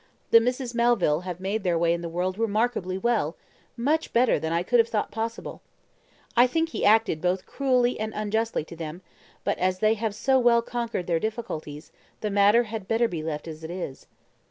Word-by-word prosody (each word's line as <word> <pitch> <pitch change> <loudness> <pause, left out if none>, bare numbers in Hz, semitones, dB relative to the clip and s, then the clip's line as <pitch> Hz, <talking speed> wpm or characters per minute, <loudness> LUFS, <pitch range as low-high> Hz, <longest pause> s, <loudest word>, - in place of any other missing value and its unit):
The 230 - +9
Misses 250 +1 -2
Melville 235 -10 +2
have 180 -1 -5
made 195 +4 -2
their 180 -3 +1
way 170 0 +2
in 170 - -3
the 170 - -5
world 185 +4 -2
remarkably 215 -4 0
well 200 -7 0 0.4
much 300 +7 0
better 240 -5 +3
than 160 +2 -3
I 170 +1 +1
could 240 +5 +2
have 230 - +4
thought 215 -2 -2
possible. 225 +2 -5 0.7
I 245 +1 +6
think 325 +5 0
he - - -4
acted 215 -7 +3
both 180 +1 0
cruelly 250 -3 +1
and 215 0 -2
unjustly 220 -1 -1
to 170 - -10
them, 165 +2 -7 0.4
but - - -1
as 185 0 +1
they 215 +3 +3
have 220 -1 -3
so 265 +4 +2
well 235 -1 +4
conquered 235 -6 -3
their 170 -2 +1
difficulties, 160 -9 -5 0.3
the 210 - -2
matter 205 +4 +5
had 220 -3 -6
better 230 +1 +2
be 170 -7 -4
left 155 0 -4
as 160 0 -8
it 160 - -6
is." 175 -6 -6
215 Hz, 200 wpm, -26 LUFS, 175-235 Hz, 0.7 s, The